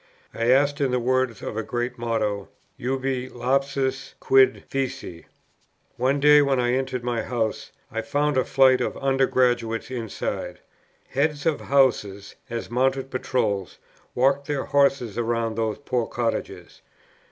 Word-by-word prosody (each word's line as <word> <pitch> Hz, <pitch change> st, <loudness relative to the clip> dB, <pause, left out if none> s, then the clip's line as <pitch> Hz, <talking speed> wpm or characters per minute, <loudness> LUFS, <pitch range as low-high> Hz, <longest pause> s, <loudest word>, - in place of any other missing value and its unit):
I 115 Hz, -, -2 dB
asked, 140 Hz, +3 st, +3 dB
in 135 Hz, -, +2 dB
the 125 Hz, -, +1 dB
words 130 Hz, -1 st, 0 dB
of -, -, -5 dB
a 110 Hz, -, -1 dB
great 120 Hz, +2 st, -3 dB
motto, 110 Hz, -4 st, -2 dB, 0.3 s
"Ubi 130 Hz, 0 st, -2 dB
lapsus? 135 Hz, +2 st, -1 dB
quid 135 Hz, -1 st, +4 dB
feci?" 130 Hz, -10 st, -4 dB, 0.7 s
One 130 Hz, +3 st, +1 dB
day 150 Hz, +1 st, +7 dB
when 140 Hz, -2 st, +2 dB
I 120 Hz, 0 st, +1 dB
entered 130 Hz, -1 st, -2 dB
my 120 Hz, -2 st, -1 dB
house, 115 Hz, -2 st, -3 dB, 0.2 s
I 115 Hz, -, -2 dB
found 145 Hz, +5 st, 0 dB
a 130 Hz, -, +3 dB
flight 130 Hz, 0 st, +4 dB
of -, -, -2 dB
Under 135 Hz, -1 st, +2 dB
graduates 120 Hz, -2 st, 0 dB
inside. 115 Hz, -5 st, -4 dB, 0.5 s
Heads 145 Hz, +1 st, 0 dB
of 160 Hz, -3 st, +1 dB
Houses, 105 Hz, -8 st, +1 dB, 0.2 s
as 115 Hz, 0 st, -5 dB
mounted 135 Hz, +2 st, 0 dB
patrols, 110 Hz, -7 st, -1 dB, 0.4 s
walked 135 Hz, +2 st, +2 dB
their 145 Hz, -3 st, -1 dB
horses 140 Hz, -6 st, +1 dB
round 115 Hz, -1 st, -1 dB
those 110 Hz, -1 st, -1 dB
poor 125 Hz, -5 st, -2 dB
cottages. 115 Hz, -2 st, -4 dB
130 Hz, 140 wpm, -24 LUFS, 115-135 Hz, 0.7 s, day